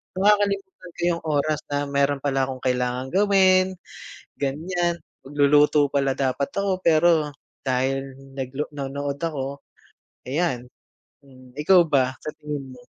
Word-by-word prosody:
Nakakalimutan 200 Hz, -2 st, +1 dB
ko -, -, -8 dB
yung -, -, -8 dB
oras 150 Hz, 0 st, +1 dB
na 145 Hz, 0 st, -1 dB
meron 140 Hz, 0 st, +1 dB
pala 135 Hz, -2 st, +1 dB
akong 130 Hz, -1 st, -7 dB
kailangan 125 Hz, 0 st, 0 dB
gawin, 190 Hz, -1 st, +4 dB, 0.6 s
ganyan. 170 Hz, +5 st, -1 dB, 0.2 s
Magluluto 145 Hz, +1 st, +4 dB
pala 140 Hz, -1 st, +1 dB
dapat 135 Hz, +1 st, 0 dB
ako 200 Hz, -1 st, 0 dB
pero 160 Hz, -2 st, +4 dB, 0.3 s
dahil 135 Hz, +1 st, -1 dB, 0.2 s
naglo 135 Hz, +2 st, -4 dB
nanood 140 Hz, 0 st, -4 dB
ako, 140 Hz, -4 st, -4 dB, 0.6 s
ayan, 130 Hz, -4 st, -1 dB, 0.6 s
hmm. 130 Hz, -2 st, -17 dB
ikaw 175 Hz, +4 st, +6 dB
ba, 130 Hz, -3 st, +2 dB
sa 155 Hz, -, -4 dB
tingin 145 Hz, -3 st, -6 dB
mo? 125 Hz, -, -15 dB
145 Hz, 125 wpm, -24 LUFS, 135-170 Hz, 0.6 s, ikaw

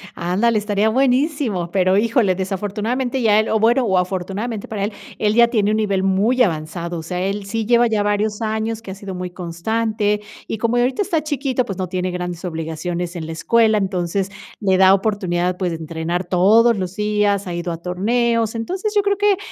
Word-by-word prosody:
Ándale, 200 Hz, +6 st, +1 dB
estaría 210 Hz, +1 st, +1 dB
buenísimo, 255 Hz, -, +1 dB
pero 185 Hz, 0 st, +3 dB
híjole, 220 Hz, -3 st, +2 dB
desafortunadamente 210 Hz, +7 st, -2 dB
ya 215 Hz, -2 st, +4 dB
él, 220 Hz, -, 0 dB
o 220 Hz, -, +2 dB
bueno, 240 Hz, +4 st, +3 dB
o 190 Hz, -4 st, +2 dB
afortunadamente 195 Hz, +4 st, -3 dB
para 205 Hz, -3 st, -3 dB
él, 205 Hz, +1 st, -2 dB, 0.3 s
él 210 Hz, 0 st, +2 dB
ya 235 Hz, 0 st, +6 dB
tiene 215 Hz, -3 st, +1 dB
un 215 Hz, -, +1 dB
nivel 200 Hz, -3 st, 0 dB
muy 205 Hz, +7 st, +2 dB
avanzado, 170 Hz, -1 st, -3 dB
o 160 Hz, -, -7 dB
sea, 180 Hz, +2 st, -4 dB
él 195 Hz, +1 st, -2 dB
sí 225 Hz, +2 st, -2 dB
lleva 240 Hz, +1 st, +4 dB
ya 215 Hz, -2 st, +1 dB
varios 210 Hz, +1 st, 0 dB
años 220 Hz, 0 st, -2 dB
que 195 Hz, -, -8 dB
ha 190 Hz, -, -6 dB
sido 195 Hz, -1 st, -7 dB
muy 180 Hz, 0 st, -4 dB
constante. 210 Hz, +4 st, -1 dB, 0.3 s
Y 220 Hz, -, -3 dB
como 230 Hz, +2 st, 0 dB
ahorita 255 Hz, +9 st, +1 dB
está 340 Hz, -6 st, 0 dB
chiquito, 270 Hz, -4 st, -1 dB
pues 195 Hz, -5 st, -5 dB
no 185 Hz, -1 st, -2 dB
tiene 185 Hz, 0 st, -2 dB
grandes 180 Hz, 0 st, -5 dB
obligaciones 170 Hz, +2 st, -4 dB
en 160 Hz, -2 st, -5 dB
la 165 Hz, -, -6 dB
escuela, 220 Hz, +5 st, +3 dB
entonces 190 Hz, 0 st, -1 dB, 0.3 s
le 190 Hz, -3 st, +2 dB
da 190 Hz, 0 st, +7 dB
oportunidad, 185 Hz, -3 st, 0 dB
pues, 180 Hz, -3 st, -1 dB
de 165 Hz, -, -3 dB
entrenar 165 Hz, +2 st, -3 dB
todos 210 Hz, +6 st, +4 dB
los 185 Hz, 0 st, -4 dB
días, 210 Hz, -2 st, +1 dB
ha 175 Hz, -, -4 dB
ido 170 Hz, 0 st, -3 dB
a 165 Hz, -, -4 dB
torneos. 230 Hz, +5 st, 0 dB
Entonces, 370 Hz, -, -3 dB
yo 410 Hz, -, +5 dB
creo 400 Hz, 0 st, +1 dB
que, 410 Hz, -1 st, +3 dB
205 Hz, 200 wpm, -20 LUFS, 180-230 Hz, 0.3 s, da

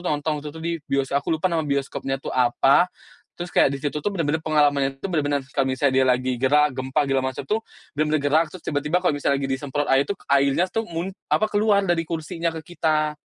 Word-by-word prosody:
nonton 155 Hz, -3 st, -1 dB
waktu 150 Hz, -, -7 dB
itu 145 Hz, -, -9 dB
tuh 160 Hz, -, -8 dB
di 170 Hz, -, -1 dB, 0.2 s
bioskop, 135 Hz, 0 st, +1 dB
aku -, -, -10 dB
lupa 175 Hz, +4 st, 0 dB
nama 165 Hz, -, +1 dB
bioskopnya 140 Hz, -1 st, -2 dB
itu -, -, -5 dB
apa. 130 Hz, +5 st, +4 dB, 0.5 s
Terus, 175 Hz, 0 st, -5 dB
kayak -, -, +6 dB
disitu 145 Hz, +2 st, -3 dB
tuh -, -, +2 dB
bener-bener 160 Hz, -5 st, 0 dB
pengalaman 145 Hz, -3 st, +2 dB
itu -, -, -3 dB
bener-bener 145 Hz, -5 st, 0 dB, 0.2 s
kalau 135 Hz, -, +3 dB
misalnya 130 Hz, +1 st, +1 dB
dia 130 Hz, -, +5 dB
lagi 130 Hz, 0 st, +1 dB
gerak, 145 Hz, +4 st, +3 dB
gempa, 130 Hz, +3 st, 0 dB
segala 135 Hz, -1 st, +1 dB
macam -, -, -6 dB
tuh, 220 Hz, -, +1 dB, 0.4 s
bener-bener 155 Hz, 0 st, +1 dB
gerak, 145 Hz, +3 st, +3 dB
terus 185 Hz, -, -9 dB
tiba-tiba 150 Hz, +4 st, 0 dB
kalau 180 Hz, -4 st, +2 dB
misalnya 140 Hz, -1 st, 0 dB
lagi 135 Hz, -, -2 dB
disemprot 140 Hz, +2 st, -2 dB
air 135 Hz, +1 st, +4 dB
itu, 200 Hz, -, -2 dB, 0.2 s
airnya 140 Hz, +6 st, +3 dB
tuh 225 Hz, +3 st, -2 dB
mun 170 Hz, +2 st, -3 dB, 0.2 s
apa 215 Hz, -, +3 dB
keluar 210 Hz, -1 st, +3 dB
dari 170 Hz, -1 st, +1 dB
kursinya 165 Hz, +1 st, -3 dB
ke 160 Hz, -, -6 dB, 0.2 s
kita. 155 Hz, -1 st, -1 dB
145 Hz, 215 wpm, -23 LUFS, 135-165 Hz, 0.5 s, kayak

